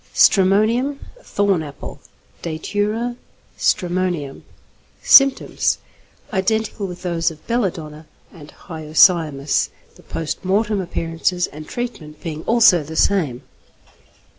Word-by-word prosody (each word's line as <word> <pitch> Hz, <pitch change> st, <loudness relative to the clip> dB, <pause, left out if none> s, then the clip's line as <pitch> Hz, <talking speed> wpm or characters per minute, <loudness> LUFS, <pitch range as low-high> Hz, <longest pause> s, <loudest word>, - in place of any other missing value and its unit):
_ -, -, -23 dB
=Stramonium= 215 Hz, +8 st, +3 dB, 0.2 s
(Thorn 200 Hz, -, 0 dB
Apple). 145 Hz, -2 st, -9 dB, 0.4 s
Datura 210 Hz, +8 st, -2 dB, 0.4 s
stramonium. 175 Hz, -6 st, -1 dB, 0.6 s
Symptoms. 275 Hz, -1 st, +5 dB, 0.6 s
Identical 215 Hz, +1 st, -1 dB
with 180 Hz, 0 st, -9 dB
those 170 Hz, -2 st, 0 dB
of 155 Hz, -2 st, -14 dB
belladonna 160 Hz, -10 st, -3 dB, 0.3 s
and 150 Hz, -4 st, -13 dB, 0.2 s
hyoscyamus, 155 Hz, -3 st, +2 dB, 0.3 s
the -, -, -17 dB
post 165 Hz, +2 st, -5 dB
mortem 205 Hz, +2 st, +1 dB
appearances 175 Hz, +1 st, -1 dB
and 155 Hz, +1 st, -10 dB
treatment 165 Hz, -12 st, -6 dB
being 155 Hz, -2 st, -6 dB
also 225 Hz, -7 st, +5 dB
the 155 Hz, +2 st, -8 dB
same. 155 Hz, -11 st, +1 dB
180 Hz, 100 wpm, -20 LUFS, 155-210 Hz, 0.6 s, Symptoms